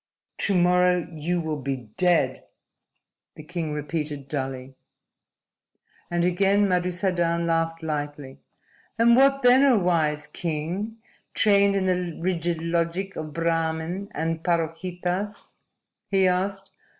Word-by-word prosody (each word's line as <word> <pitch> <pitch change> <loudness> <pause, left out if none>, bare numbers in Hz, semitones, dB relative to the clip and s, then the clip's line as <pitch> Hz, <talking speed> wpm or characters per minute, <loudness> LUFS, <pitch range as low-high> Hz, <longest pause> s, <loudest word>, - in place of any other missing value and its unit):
"To 200 - +1
morrow 180 0 +3
you 165 +3 -1
will 155 -3 -3
be 130 -5 -5
dead," 180 -2 +1 0.9
the 155 - -10
king 165 -1 -4
repeated 150 -1 -4
dully. 135 -2 -4 1.4
And 175 0 0
again 195 +3 +3
Madusadan 175 -2 0
laughed 165 0 0
lightly. 145 -3 -4 0.6
"And 235 +1 +5
what 275 +1 +4
then, 250 +2 +6
O 270 -4 +5
wise 160 -5 +1
king, 170 +8 -4 0.4
trained 200 -1 +4
in 195 -1 0
the 180 -3 -1
rigid 170 -2 -1
logic 170 +3 -1
of 155 -1 -5
Brahmin 165 +3 -1
and 165 0 -2
Parohitas?" 180 +4 -2 0.6
he 195 -1 +4
asked. 195 +2 -1
170 Hz, 115 wpm, -25 LUFS, 160-185 Hz, 1.4 s, then